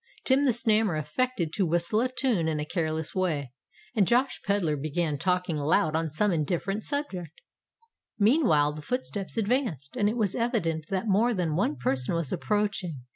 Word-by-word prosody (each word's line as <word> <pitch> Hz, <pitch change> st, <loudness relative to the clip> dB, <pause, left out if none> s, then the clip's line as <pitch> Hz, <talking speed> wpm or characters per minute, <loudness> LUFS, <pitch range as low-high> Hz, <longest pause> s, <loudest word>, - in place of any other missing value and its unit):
Tim 275 Hz, +2 st, +3 dB
the -, -, +4 dB
Snammer 220 Hz, -6 st, +2 dB
affected 170 Hz, -, -1 dB
to 195 Hz, -, +1 dB
whistle 175 Hz, +6 st, +1 dB
a 255 Hz, -, +1 dB
tune 250 Hz, -, +1 dB
in 155 Hz, -1 st, -1 dB
a 150 Hz, -, -2 dB
careless 160 Hz, -1 st, -2 dB
way; 150 Hz, -9 st, -1 dB, 0.4 s
and 200 Hz, -5 st, +3 dB
Josh 255 Hz, +3 st, +1 dB
Pedler 195 Hz, -6 st, +1 dB
began 150 Hz, +1 st, -2 dB
talking 180 Hz, -1 st, 0 dB
loud 155 Hz, +1 st, +2 dB
on 160 Hz, 0 st, 0 dB
some 200 Hz, +8 st, +1 dB
indifferent 180 Hz, +6 st, -1 dB
subject. 190 Hz, -, -4 dB, 0.8 s
Meantime, 200 Hz, -, +3 dB
the 150 Hz, -, -8 dB
footsteps 230 Hz, -1 st, -3 dB
advanced; 220 Hz, -, -1 dB
and 205 Hz, -4 st, +2 dB
it 225 Hz, -, -3 dB
was 210 Hz, -5 st, +1 dB
evident 170 Hz, -10 st, -1 dB
that 195 Hz, +2 st, -2 dB
more 220 Hz, +4 st, +3 dB
than 170 Hz, -5 st, -1 dB
one 165 Hz, -4 st, +1 dB
person 130 Hz, +3 st, -1 dB
was 165 Hz, -5 st, -2 dB
approaching. 205 Hz, -, -1 dB
180 Hz, 170 wpm, -27 LUFS, 155-220 Hz, 0.8 s, the